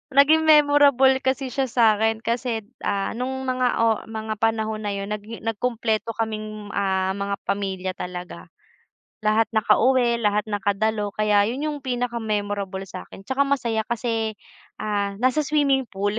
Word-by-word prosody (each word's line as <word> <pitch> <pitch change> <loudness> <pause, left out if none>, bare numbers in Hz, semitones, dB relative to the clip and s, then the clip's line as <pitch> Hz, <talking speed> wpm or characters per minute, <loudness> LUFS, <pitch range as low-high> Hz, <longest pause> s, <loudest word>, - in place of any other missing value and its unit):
Naging 315 +3 +5
memorable 285 -3 +5
kasi 265 0 -1
siya 265 +2 0
sa'kin 225 -2 +3
kasi, 235 -1 -1 0.2
ah, 200 -1 -1
nung 265 +2 -3
mga 255 0 +1 0.2
oh 225 -1 +3
mga 220 -1 -4
panahon 220 -1 0
na 200 - -2
'yun 200 +1 -5
nagi 210 +2 -6
nagkumpleto 225 0 -1
kaming 215 -2 -4
ah, 190 -1 0
mga 200 +1 -2
pamilya 190 -2 -2
talaga. 180 -1 -7 0.8
Lahat 215 +1 +3
nakauwi, 235 +2 +3
lahat 210 -1 +1
nakadalo, 205 +1 -1
kaya 210 -1 +3
'yun 250 +6 -3
'yung 295 - -5
pinaka-memorable 210 -6 -2
sa'kin 190 0 -10
tsaka 265 +7 0
masaya 235 -6 0
kasi, 225 -2 -2 0.5
ah, 205 -2 -1
nasa 260 +4 +2
swimming 275 -3 +2
pool. 205 +1 -2
220 Hz, 135 wpm, -23 LUFS, 205-250 Hz, 0.8 s, Naging